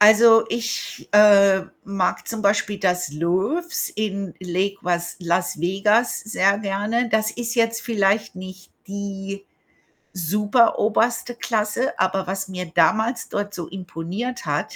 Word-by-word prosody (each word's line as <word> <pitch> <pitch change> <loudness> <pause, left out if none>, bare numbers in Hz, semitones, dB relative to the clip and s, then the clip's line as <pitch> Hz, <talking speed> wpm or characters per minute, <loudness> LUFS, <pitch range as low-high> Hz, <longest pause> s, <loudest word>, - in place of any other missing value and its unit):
Also, 225 +2 +7
ich, 230 -1 -4
äh, 200 -2 +6 0.2
mag 195 -2 -2
zum 225 -1 -4
Beispiel 205 0 +1
das 180 -6 0
Loews 190 - -1
in 200 -4 -3
Lake 185 +2 -2
was 175 -1 -2
Las 175 -1 -1
Vegas 205 +6 +1
sehr 200 -2 +1
gerne. 215 +4 -1
Das 220 0 +1
ist 235 0 -4
jetzt 230 -1 +1
vielleicht 205 -3 0
nicht 185 0 -10 0.2
die 200 0 -6 0.7
superoberste 215 +5 +1
Klasse, 220 +2 -1
aber 190 0 0
was 190 +1 -3
mir 180 -1 -5
damals 220 +8 +2
dort 205 0 -3
so 175 -4 -6
imponiert 190 +6 -6
hat, - - -2
200 Hz, 125 wpm, -22 LUFS, 185-220 Hz, 0.7 s, Also